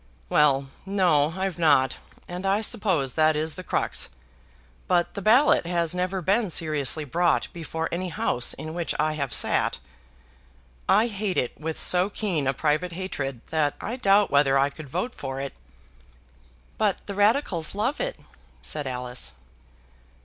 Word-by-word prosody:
"Well; 140 -2 +3
no, 175 -6 +2
I've 190 -2 -2
not. 145 -5 +3 0.3
And 180 +1 -6
I 195 +2 +1
suppose 190 - +1
that 155 -1 +3
is 155 +1 -1
the 185 - -8
crux. - - 0 0.8
But 175 -1 +1
the 200 - -5
ballot 225 - +4
has 170 -2 +1
never 180 +1 -2
been 200 +4 +2
seriously 155 -2 0
brought 175 +5 +1
before 160 -1 -4
any 180 +2 -2
House 125 -6 0
in 155 +2 -7
which 170 -1 -2
I 155 +1 +1
have 140 -4 -3
sat. - - +2 1.1
I 215 +3 +5
hate 205 -4 -2
it 125 - -1
with 160 +1 -4
so 180 +2 +3
keen 185 -10 -1
a 135 - +2
private 155 +5 0
hatred, 140 -9 -4
that 155 -3 +1
I 235 - -4
doubt 205 -4 +3
whether 140 -1 +4
I 140 +1 +2
could 150 -1 -11
vote 180 - -3
for 135 -1 -5
it." 140 0 -5 1.3
"But 205 -3 0
the 200 - -5
Radicals 205 - +2
love 235 +8 -1
it," - - -3 0.4
said 150 -3 -2
Alice. 125 -1 -3
170 Hz, 155 wpm, -25 LUFS, 145-195 Hz, 1.3 s, I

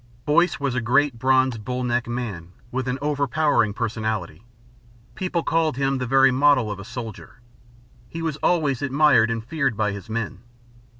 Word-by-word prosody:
Boyce 150 -2 +2
was 140 -3 -1
a 130 - -1
great 130 +1 +2
bronzed, 130 -3 +2
bull 125 +2 -3
necked 120 0 -1
man, 105 -8 -5 0.2
with 130 +1 -3
an 125 +1 -1
overpowering 145 -5 +1
personality. 110 -6 -3 0.7
People 180 -3 -2
called 160 -4 0
him 135 -1 0
the 125 - -3
very 135 +1 +5
model 130 -4 +3
of 100 - -6
a - - -7
soldier. 115 +1 -8 0.7
He 165 +6 -6
was 155 -3 -2
always 150 -6 +1
admired 135 -4 +4
and 115 -1 -3
feared 135 -5 -1
by 105 -2 +1
his 100 +2 -8
men. 110 -4 -3
125 Hz, 165 wpm, -23 LUFS, 115-145 Hz, 0.7 s, very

